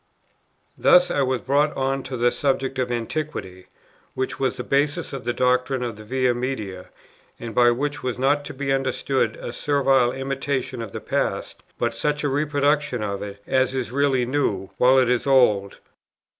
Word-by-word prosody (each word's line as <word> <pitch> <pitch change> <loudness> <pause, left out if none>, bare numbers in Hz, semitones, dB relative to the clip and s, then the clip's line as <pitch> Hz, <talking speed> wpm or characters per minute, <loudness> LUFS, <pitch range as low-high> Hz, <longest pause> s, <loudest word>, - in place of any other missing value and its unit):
Thus 180 0 +5
I 140 - +1
was 130 -2 0
brought 145 +3 +1
on 135 0 0
to 130 -1 -5
the 120 +1 +3
subject 135 -1 -1
of 125 -1 -1
Antiquity, 115 -6 -4 0.5
which 130 0 -3
was 130 -1 0
the 125 - -4
basis 145 +6 0
of 135 -4 -6
the 120 - +1
doctrine 125 +1 +1
of 120 -3 -4
the 110 - -11
Via 125 +2 +1
Media, 110 -7 -4 0.5
and 115 -1 -6
by 120 +2 +5
which 145 +4 -1
was 125 -2 -3
not 140 +3 +2
to 145 - -7
be 135 0 -1
understood 130 -3 0
a 120 - -7
servile 135 -3 +2
imitation 135 -1 -3
of 115 -3 -6
the - - -6
past, - - -2 0.2
but 120 0 -1
such 150 +5 -1
a 145 - +1
reproduction 145 -3 +1
of 100 -1 -3
it 100 0 -8
as 130 0 +1
is 130 -3 -3
really 135 -2 +2
new, 105 -8 -1
while 130 +2 +5
it 130 -2 +4
is 125 +2 0
old. 105 -7 +3
130 Hz, 180 wpm, -23 LUFS, 120-140 Hz, 0.5 s, Thus